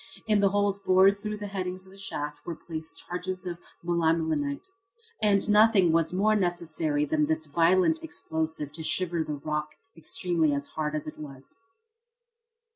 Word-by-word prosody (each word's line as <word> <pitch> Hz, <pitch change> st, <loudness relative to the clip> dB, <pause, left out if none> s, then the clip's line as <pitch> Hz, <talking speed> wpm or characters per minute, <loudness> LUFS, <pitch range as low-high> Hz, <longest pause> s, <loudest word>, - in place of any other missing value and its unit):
In 215 Hz, -1 st, +3 dB
the 200 Hz, -1 st, +4 dB
holes 200 Hz, 0 st, +1 dB
bored 190 Hz, +1 st, +5 dB
through 210 Hz, +1 st, -4 dB
the 205 Hz, -, -6 dB
headings 185 Hz, -2 st, -4 dB
of 190 Hz, -, -16 dB
the 195 Hz, -, -15 dB
shaft 150 Hz, -6 st, -5 dB
were 170 Hz, -, -5 dB
placed 160 Hz, -1 st, -7 dB
charges 185 Hz, +1 st, -4 dB
of 175 Hz, -1 st, -4 dB, 0.3 s
melimelonite. 160 Hz, -4 st, 0 dB, 0.6 s
And 200 Hz, -1 st, +3 dB
nothing 210 Hz, -4 st, +5 dB
more 165 Hz, +1 st, +4 dB
was 165 Hz, -, -3 dB
necessary 175 Hz, -7 st, +1 dB
than 150 Hz, 0 st, +1 dB
this 160 Hz, 0 st, 0 dB
violent 180 Hz, -, +3 dB
explosive 160 Hz, -, -3 dB
to 160 Hz, +2 st, -7 dB
shiver 170 Hz, 0 st, 0 dB
the 150 Hz, -1 st, -4 dB
rock, 150 Hz, +1 st, -3 dB, 0.2 s
extremely 165 Hz, -3 st, 0 dB, 0.2 s
hard 155 Hz, -1 st, -1 dB
as 150 Hz, -, -3 dB
it 155 Hz, -, -8 dB
was. 140 Hz, -3 st, -9 dB
170 Hz, 155 wpm, -28 LUFS, 155-190 Hz, 0.6 s, bored